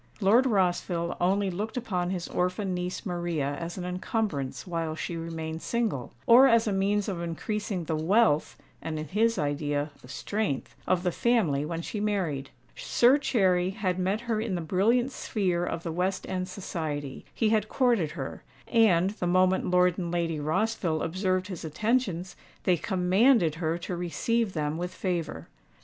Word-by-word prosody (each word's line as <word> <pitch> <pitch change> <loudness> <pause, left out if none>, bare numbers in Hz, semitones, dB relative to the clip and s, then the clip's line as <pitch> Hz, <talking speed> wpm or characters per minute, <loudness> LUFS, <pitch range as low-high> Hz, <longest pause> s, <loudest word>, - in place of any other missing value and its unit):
Lord 230 +6 +4
Rossville 175 -4 0
only 195 +2 +2
looked 210 +7 -4
upon 180 -8 -1
his 180 -2 -3
orphan 185 +2 -1
niece 180 +4 -4
Maria 170 -6 -2
as 170 +1 -5
an 180 - -4
encumbrance 180 - -2
while 165 -3 -2
she 170 - -4
remained 165 -1 -5
single, 220 - -2
or 250 +3 +8
as 230 -1 +4
a 210 - 0
means 200 +1 +1
of 185 -4 -3
increasing 185 +3 -3
the 160 0 -2
wealth 160 0 +2 0.2
(and 160 -1 -4
in 155 -1 -5
his 225 +5 +2
idea, 145 0 -1
the - - -14
strength) 200 +1 -3
of 180 -1 +2
the 180 - +1
family 180 -12 +2
when 165 +1 -4
she 210 - -4
married. 175 -10 -1 0.3
Sir 255 +4 +4
Cherry 185 -9 +2
had 190 -2 -2
met 190 +4 0
her 230 -2 -1
in 220 -4 -2
the - - -1
brilliant 225 - +2
sphere 185 -8 -1
of 165 -1 -3
the 165 - -3
West 180 +3 -1
End 185 -1 -2
society: 155 -7 -4
he 220 - +1
had 215 -1 +1
courted 235 - +2
her; 135 -5 -6 0.3
and, 195 -6 +4
the 195 -4 -3
moment 185 +1 +3
Lord 180 0 +3
and 175 -2 -3
Lady 165 -3 -1
Rossville 160 +1 0
observed 185 +2 0
his 185 -4 -7
attentions, 185 - -1 0.3
they 180 - +4
commanded 185 - +3
her 160 0 0
to 175 +1 -5
receive 195 +5 -1
them 150 0 -2
with 180 +1 -4
favour. 175 -4 -3
180 Hz, 165 wpm, -28 LUFS, 165-210 Hz, 0.3 s, or